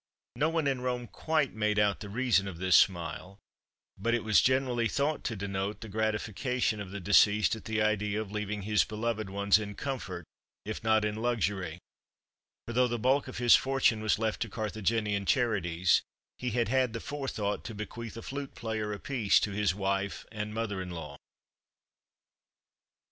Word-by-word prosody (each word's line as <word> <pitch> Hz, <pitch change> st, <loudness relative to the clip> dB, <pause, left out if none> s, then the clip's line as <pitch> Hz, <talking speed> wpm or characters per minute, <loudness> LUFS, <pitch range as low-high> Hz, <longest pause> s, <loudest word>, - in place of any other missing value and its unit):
No 150 Hz, -, +2 dB
one 165 Hz, -2 st, 0 dB
in 135 Hz, -2 st, 0 dB
Rome 125 Hz, -1 st, -2 dB
quite 155 Hz, +6 st, -1 dB
made 105 Hz, -1 st, 0 dB
out 105 Hz, -1 st, +2 dB
the 105 Hz, -, -7 dB
reason 110 Hz, -3 st, +2 dB
of 90 Hz, -4 st, -6 dB
this 95 Hz, 0 st, +3 dB
smile, 90 Hz, +2 st, +2 dB, 0.6 s
but 115 Hz, +4 st, +1 dB
it 120 Hz, -, -2 dB
was 110 Hz, -2 st, +5 dB
generally 125 Hz, -3 st, +2 dB
thought 145 Hz, +5 st, -1 dB
to 115 Hz, -, -1 dB
denote 100 Hz, 0 st, -3 dB
the 110 Hz, -, -7 dB
gratification 110 Hz, +2 st, -1 dB
of 100 Hz, -, -6 dB
the 100 Hz, +2 st, -6 dB
deceased 105 Hz, +3 st, +4 dB
at 110 Hz, -, -11 dB
the 110 Hz, -1 st, 0 dB
idea 105 Hz, -1 st, 0 dB
of 110 Hz, -2 st, -5 dB
leaving 105 Hz, -1 st, -3 dB
his 105 Hz, +1 st, +3 dB
beloved 110 Hz, -1 st, -3 dB
ones 100 Hz, +1 st, +3 dB
in 105 Hz, -1 st, -6 dB
comfort, 100 Hz, -, -5 dB, 0.4 s
if 110 Hz, +1 st, -5 dB
not 110 Hz, -1 st, +3 dB
in 105 Hz, 0 st, -2 dB
luxury; 105 Hz, -7 st, -1 dB, 0.9 s
for, 120 Hz, -, -6 dB
though 125 Hz, +1 st, +4 dB
the 120 Hz, 0 st, -2 dB
bulk 130 Hz, +5 st, +2 dB
of 130 Hz, -, -7 dB
his 120 Hz, -1 st, +7 dB
fortune 135 Hz, -5 st, +2 dB
was 110 Hz, -1 st, +2 dB
left 110 Hz, 0 st, -1 dB
to 115 Hz, -, -1 dB
Carthaginian 105 Hz, -1 st, -1 dB
charities, 95 Hz, -8 st, +2 dB, 0.4 s
he 125 Hz, -, -2 dB
had 120 Hz, 0 st, 0 dB
had 130 Hz, -1 st, +1 dB
the 115 Hz, -, -3 dB
forethought 130 Hz, -7 st, -3 dB
to 115 Hz, -, -6 dB
bequeath 115 Hz, +2 st, -7 dB
a 115 Hz, -, -7 dB
flute 140 Hz, 0 st, -6 dB
player 110 Hz, -2 st, -3 dB
apiece 110 Hz, 0 st, +2 dB
to 105 Hz, -, -1 dB
his 100 Hz, -3 st, +1 dB
wife 100 Hz, 0 st, -2 dB
and 105 Hz, -1 st, -4 dB
mother 105 Hz, -3 st, -2 dB
in 90 Hz, -, -6 dB
law. 80 Hz, -5 st, -7 dB
110 Hz, 175 wpm, -30 LUFS, 100-120 Hz, 0.9 s, his